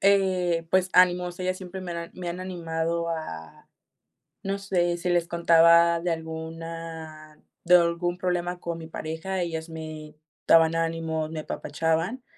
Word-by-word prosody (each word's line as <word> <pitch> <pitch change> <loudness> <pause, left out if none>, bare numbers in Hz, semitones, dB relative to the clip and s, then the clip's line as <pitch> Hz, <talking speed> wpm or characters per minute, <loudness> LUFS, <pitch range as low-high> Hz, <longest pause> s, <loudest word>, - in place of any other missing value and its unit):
Eh, 185 -4 +2
pues, 185 0 +2
ánimos, 180 -1 +4
ellas 185 0 -1
siempre 185 0 -8
me 175 -2 -5
han - - -5
an 170 - -7
me 180 -1 -5
han 175 +2 -4
animado 170 -2 -2
a, 155 - -6 0.8
no 195 0 -1
sé, 175 -3 0
si 180 +1 -3
les 175 -1 +2
contaba 170 0 +5
de 175 0 -1
alguna 160 -1 -7 0.2
de 180 +1 +6
algún 175 +1 +2
problema 180 -1 -2
con 170 -1 -4
mi 160 - -8
pareja, 160 +4 -4
ellas 165 -1 -4
me 155 -1 -8 0.3
daban 165 0 +6
ánimo, 165 -1 -1
me 160 -1 -4
apapachaban. 165 +12 -2
170 Hz, 150 wpm, -26 LUFS, 160-180 Hz, 0.8 s, de